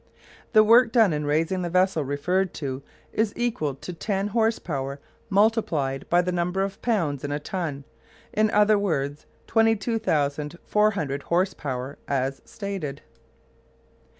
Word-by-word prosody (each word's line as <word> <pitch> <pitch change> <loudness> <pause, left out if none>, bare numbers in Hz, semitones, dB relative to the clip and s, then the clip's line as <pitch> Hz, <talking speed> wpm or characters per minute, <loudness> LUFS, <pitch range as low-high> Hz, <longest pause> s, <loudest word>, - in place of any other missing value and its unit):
The 215 -1 +8
work 230 +2 +6
done 225 -8 +4
in 150 -1 -2
raising 165 +5 +1
the 175 - -2
vessel 185 -2 +2
referred 170 +7 -1
to 135 -3 -4 0.3
is 220 -1 0
equal 215 - -1
to 180 +6 -8
ten 195 +3 -2
horse 225 +1 +2
power 140 -3 -4 0.3
multiplied 190 - +1
by 175 +1 +4
the 180 - -1
number 180 +2 0
of 195 0 -5
pounds 165 - 0
in 145 - -3
a 145 - 0
ton, 150 -3 -4 0.5
or, - - -3
in 215 - +4
other 210 0 +4
words, 145 -7 -2 0.2
22,400 195 - +1
horse 185 +4 +1
power, 130 -1 -5
as 135 0 -1
stated. 190 -9 -5
180 Hz, 140 wpm, -25 LUFS, 145-210 Hz, 0.5 s, The